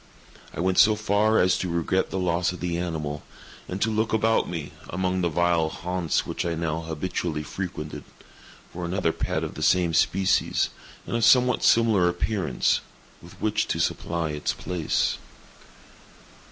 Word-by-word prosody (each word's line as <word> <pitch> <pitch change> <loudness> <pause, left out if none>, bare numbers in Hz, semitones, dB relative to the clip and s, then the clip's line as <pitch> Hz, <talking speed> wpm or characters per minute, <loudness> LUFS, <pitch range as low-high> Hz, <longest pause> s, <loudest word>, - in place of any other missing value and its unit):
I - - -9
went 95 +1 +2
so 110 0 +6
far 105 +1 +2
as 90 0 +3
to 90 - -2
regret 85 +2 0
the - - -3
loss 90 -1 +1
of 90 - -8
the 90 -1 -2
animal, 80 -4 -3 0.5
and 90 - -4
to 110 - +1
look 110 +1 0
about 110 +1 +2
me, 80 -4 -5 0.2
among 95 +1 -1
the 85 - +1
vile 85 -1 +2
haunts 90 -1 -2
which 85 - -3
I 85 -1 -1
now 80 0 -2
habitually 80 -1 -3
frequented, 75 -2 -6 0.7
for 90 - -6
another 85 -1 0
pet - - -2
of - - -4
the - - -8
same 90 -3 +3
species, 95 +4 +2 0.4
and - - -3
of 115 - 0
somewhat 125 +1 +5
similar 110 -6 +4
appearance, 90 0 0 0.4
with 85 - -15
which 110 -1 0
to - - -2
supply 85 -2 -1
its 75 0 -2
place. 85 -3 -1
90 Hz, 160 wpm, -25 LUFS, 85-95 Hz, 0.7 s, so